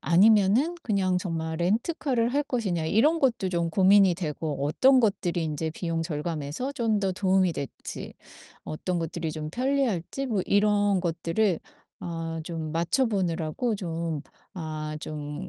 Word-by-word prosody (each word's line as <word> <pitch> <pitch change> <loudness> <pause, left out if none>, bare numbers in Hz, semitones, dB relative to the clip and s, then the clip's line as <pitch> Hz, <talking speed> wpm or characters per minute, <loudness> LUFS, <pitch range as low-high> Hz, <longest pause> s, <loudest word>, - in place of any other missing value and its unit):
아니면은 210 - +4
그냥 190 -4 +1
정말 160 -3 -3
렌터카를 235 - 0
할 290 - +3
것이냐?' 200 - -1
이런 295 - +3
것도 235 -8 +1
좀 170 -2 0
고민이 195 0 +5
되고 150 -4 -3
어떤 260 - +5
것들이 180 -6 0
인제 160 +1 -2
비용 165 0 -2
절감에서 160 - -3
좀 230 -6 +1
더 195 -2 0
도움이 185 -1 +2
될지 140 -3 -7 0.5
어떤 175 +3 -3
것들이 165 0 -3
좀 155 -1 -5
편리할지 260 - -1
뭐 210 -7 0
이런 205 -1 +3
것들을 170 +2 0 0.4
아 165 -1 -4
좀 160 -2 -5
맞춰보느라고 180 - 0
좀 165 -4 -3 0.3
아 155 -3 -5
좀 150 +4 -6
180 Hz, 285 characters per minute, -27 LUFS, 160-215 Hz, 0.5 s, 고민이